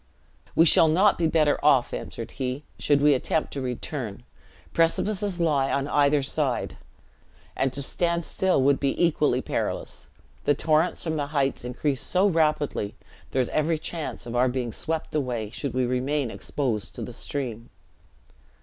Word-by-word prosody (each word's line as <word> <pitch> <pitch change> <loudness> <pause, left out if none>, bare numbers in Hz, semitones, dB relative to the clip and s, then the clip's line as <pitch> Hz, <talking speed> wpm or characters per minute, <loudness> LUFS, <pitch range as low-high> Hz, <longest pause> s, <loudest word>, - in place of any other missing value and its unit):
"We 165 - +6
shall 165 0 +7
not 185 +6 +3
be 165 - +3
better 155 -3 +2
off," 140 -4 +4
answered 115 - -6
he, 130 +2 -4 0.2
"should 145 -1 +2
we 145 0 +5
attempt 150 +4 -1
to 140 - -3
return: 125 -3 -4 0.5
precipices 190 +3 +1
lie 145 -5 +2
on 140 0 0
either 145 0 +3
side: 135 -3 -1 0.8
and 135 - 0
to 140 +2 -2
stand 170 +3 0
still 185 -8 +1
would 140 0 +3
be 140 -1 -1
equally 150 -6 +2
perilous: - - -3 0.4
the 145 - +3
torrents 155 +4 +1
from 160 - -1
the 145 -1 -2
heights 140 -4 -1
increase 130 +2 -1
so 185 +2 +2
rapidly, 155 - +1 0.3
there 130 - +1
is - - -3
every 155 +1 +1
chance 160 0 -5
of 120 0 -6
our 125 +1 +3
being 125 -2 -3
swept 160 +7 -3
away, 125 -8 -2
should 135 +2 -4
we 130 -1 +2
remain 130 +1 -1
exposed 115 -7 -3
to - - -5
the 125 - -7
stream." 120 -3 -5
145 Hz, 160 wpm, -25 LUFS, 125-160 Hz, 0.8 s, shall